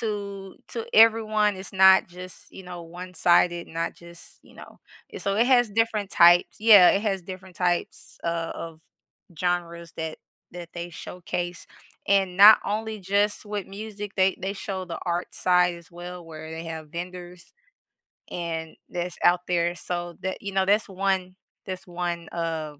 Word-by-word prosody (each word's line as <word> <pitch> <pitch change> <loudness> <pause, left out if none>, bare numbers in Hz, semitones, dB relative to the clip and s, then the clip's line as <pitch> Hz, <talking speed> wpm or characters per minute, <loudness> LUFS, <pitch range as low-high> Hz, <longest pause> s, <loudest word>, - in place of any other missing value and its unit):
to 200 -3 -5
to 460 0 -4
everyone, 215 -2 +4
it's 190 0 -6
not 190 0 +6
just, 180 +1 -10
you 190 - -11
know, 175 -1 -8
one-sided, 175 0 +1
not 165 +1 -3
just, 170 0 -11
you - - -20
know? - - -13 0.3
And - - -7
so 195 - 0
it 230 +3 +3
has 245 -3 +4
different 210 -1 0
types 175 +1 +5
yeah, 210 -5 +8
it 195 - +1
has 195 -4 -1
different 185 0 -10
types 175 -1 -2
o - - 0
of 165 -1 -5 0.6
genres 170 -2 -2
that 160 -1 -5 0.3
that 175 -1 -9
they 175 0 -6
showcase, 175 0 -5 0.4
and 195 -2 +2
not 210 +3 +10
only 215 +1 -3
just 200 +3 0
with 205 -2 -4
music, 205 0 -7
they 190 -1 +3
they 190 +2 -2
show 195 -1 -5
the 175 -2 -6
art 175 0 -2
side 180 -1 +3
as 170 -1 -15
well 175 0 -9
where 160 -1 -9
they 160 +1 -6
have 160 -2 -7
vendors, 180 +1 -8 0.8
and 165 -2 -4
that's 175 0 -4
out 175 0 +4
there, 175 -1 +1
so, 175 -1 -4
that 190 0 -4
you 200 - -5
know, 190 0 +2
that's 205 +2 +2
one 190 -1 -1 0.3
that's 185 -1 -6
one, 175 -1 -4
of 160 -3 -4
180 Hz, 165 wpm, -25 LUFS, 170-195 Hz, 0.8 s, not